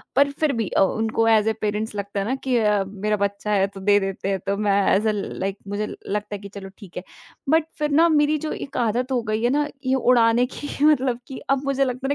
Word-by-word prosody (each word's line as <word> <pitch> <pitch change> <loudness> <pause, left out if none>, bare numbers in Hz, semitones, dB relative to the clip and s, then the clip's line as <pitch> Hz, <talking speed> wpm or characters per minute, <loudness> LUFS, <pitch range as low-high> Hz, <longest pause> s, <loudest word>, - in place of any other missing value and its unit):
पर 280 +1 +4
फिर 290 0 0
भी 225 -3 -1
अ, - - +1
उनको 220 +3 +1
एज़ 220 -1 +4
अ - - +1
पेरेंट्स 210 +1 -2
लगता 200 0 -4
है 195 - -1
ना 260 - 0
कि 260 -2 +1
अ, 210 -3 +2
मेरा 210 +2 -2
बच्चा 200 +1 -4
है 195 -1 +3
तो 195 0 -11
दे 205 +1 +4
देते 195 0 -3
हैं। 195 -1 0
तो 200 0 0
मैं 200 -1 +2
एज़ 210 +3 +1
अ - - +3
लाइक 195 -1 -4
मुझे 205 +1 -2
लगता 210 0 -5
है - - -7
कि 200 - -9
चलो 195 -1 -7
ठीक 200 -5 -12
है। 180 - -4 0.5
बट 320 +1 +3
फिर 300 0 0
ना 325 +4 +5
मेरी 300 -1 +3
जो - - -3
एक - - -7
आदत 245 +4 -1
हो 250 -2 +1
गई 215 +1 -1
है 240 - +3
ना 290 +3 +1 0.2
ये 260 0 +2
उड़ाने 240 -1 +4
की 290 - -6 0.2
मतलब 265 -5 +3
कि 265 - -7
अब 275 0 +1
मुझे 275 0 +1
लगता 255 +1 -3
है - - -2
220 Hz, 255 wpm, -23 LUFS, 200-265 Hz, 0.5 s, ना